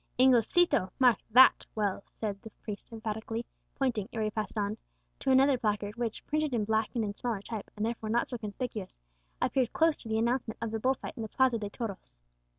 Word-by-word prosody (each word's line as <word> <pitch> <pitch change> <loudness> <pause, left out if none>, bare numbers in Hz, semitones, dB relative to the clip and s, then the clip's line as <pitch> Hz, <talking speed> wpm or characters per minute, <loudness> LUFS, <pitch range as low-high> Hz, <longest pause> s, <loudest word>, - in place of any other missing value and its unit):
"Inglesito, 255 - +4
mark 250 -6 +5
that 255 +4 +7
well!" 205 -2 -1
said 205 -3 -5
the 220 - -9
priest 210 -2 -6
emphatically, 225 +1 -4 0.3
pointing, 245 -7 -1
ere 225 -2 -2
he 215 - 0
passed 215 0 -4
on, 205 0 0 0.4
to 270 - -2
another 265 0 +5
placard 210 -1 -1
which, 235 -2 -3
printed 305 -3 0
in 215 -3 +1
black 220 0 +1
and 230 - +1
in 205 - -3
smaller 230 -1 -2
type, 220 -2 -6
and 210 - 0
therefore 225 -1 -3
not 235 +2 +1
so 245 - -5
conspicuous, 215 -2 -5 0.5
appeared 255 -3 +1
close 325 -1 +4
to 225 - -10
the 220 - +1
announcement 235 0 0
of 230 - -3
the 225 - -2
bull 260 +4 +2
fight - - -7
in - - -4
the 220 - -4
Plaza 260 -2 +2
de 205 -1 -4
Toros. 200 - -6
225 Hz, 205 wpm, -30 LUFS, 210-250 Hz, 0.5 s, that